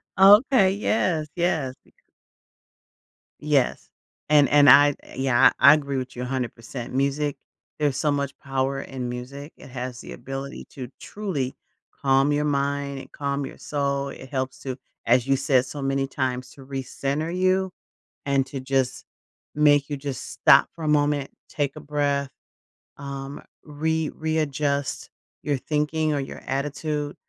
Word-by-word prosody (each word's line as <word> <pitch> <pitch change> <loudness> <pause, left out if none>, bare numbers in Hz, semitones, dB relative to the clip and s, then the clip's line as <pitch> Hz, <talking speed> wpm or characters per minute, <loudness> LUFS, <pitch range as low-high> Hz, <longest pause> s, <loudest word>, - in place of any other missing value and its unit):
Oh, 195 +2 +9
okay, 195 -8 +5
yes, 180 -7 +1
yes, 160 -7 0
becau - - -31 1.3
Yes. 145 -4 0 0.4
And 145 -2 +6
and 145 -1 +7
I 145 +3 +9
eh - - -14
yeah, 130 -1 +5
I 140 +3 +9
agree 140 -3 -1
with 130 0 -5
you 125 - -5
100%. 125 -1 -5
Music 140 +2 0 0.4
there's 145 -3 +1
so 150 -2 +1
much 140 -1 -2
power 135 0 -1
in 130 -3 -5
music, 135 +5 -7
it 140 - -13
has 125 -1 -6
the - - -10
ability 135 +1 -7
to 125 -3 -7
truly 170 -12 -4 0.5
calm 135 +1 +3
your 150 - +1
mind 140 -1 -1
and - - -12
calm 140 -1 -2
your - - -9
soul, 140 -1 -2
it 130 - -10
helps 130 -1 -3
to 130 -2 -5 0.3
as 120 +1 +4
you 135 - +4
said 135 -2 +2
so 140 +2 -7
many 135 0 0
times 130 -2 -3
to 135 - -14
recenter 140 +4 -3
you 185 0 +2 0.5
and 140 -1 +2
to 135 0 -5
just 130 -1 -1 0.5
make 145 -1 +4
you 145 - -3
just 140 -1 -6
stop 140 -3 +5
for 165 - -9
a - - -1
moment, 145 -2 +2 0.2
take 145 -3 -2
a - - -7
breath, 140 -1 -1 0.7
um, 140 0 -7 0.2
re 160 +1 -1
readjust 150 -3 -1 0.3
your 145 -2 0
thinking 155 +2 0
or 145 - 0
your 135 - -6
attitude. 145 +2 -2
140 Hz, 150 wpm, -24 LUFS, 135-150 Hz, 1.3 s, Oh